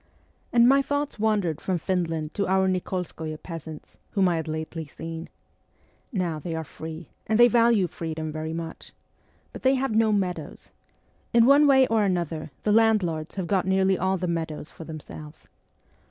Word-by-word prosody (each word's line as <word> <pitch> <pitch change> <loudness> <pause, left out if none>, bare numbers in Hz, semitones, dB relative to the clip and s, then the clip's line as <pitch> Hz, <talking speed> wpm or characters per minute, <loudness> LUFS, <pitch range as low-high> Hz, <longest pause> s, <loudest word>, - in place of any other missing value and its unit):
And 235 0 +6
my 275 +2 +6
thoughts 285 -3 -2
wandered 205 -7 +1
from 185 -2 -1
Finland 165 -4 -2
to 200 - -1
our 190 0 +3
Nik61skoye 180 -4 -3
peasants, 160 -3 -9
whom 195 -3 +3
I 170 - +1
had 160 - -4
lately 160 0 -4
seen. 165 +2 -7 0.8
Now 175 - -1
they 165 +1 -4
are 160 - -3
free, 160 +1 -9 0.2
and 220 +1 +2
they 240 - +9
value 230 -4 +4
freedom 160 -2 -5
very 155 +1 -4
much. 165 0 -7 0.6
But - - -8
they 265 +1 +4
have 265 -3 -1
no 220 -1 +4
meadows. 190 -4 -3 0.6
In 230 -1 +7
one 285 +3 +6
way 265 -1 +6
or 225 -3 +2
another 170 -5 -1
the 210 - +2
landlords 205 -8 +2
have 190 -3 -2
got 190 +1 0
nearly 190 0 +3
all 190 +1 0
the 180 - -3
meadows 160 -3 -3
for 165 - -10
them 155 -1 -7
selves. 150 +1 -12
180 Hz, 170 wpm, -26 LUFS, 160-215 Hz, 0.8 s, they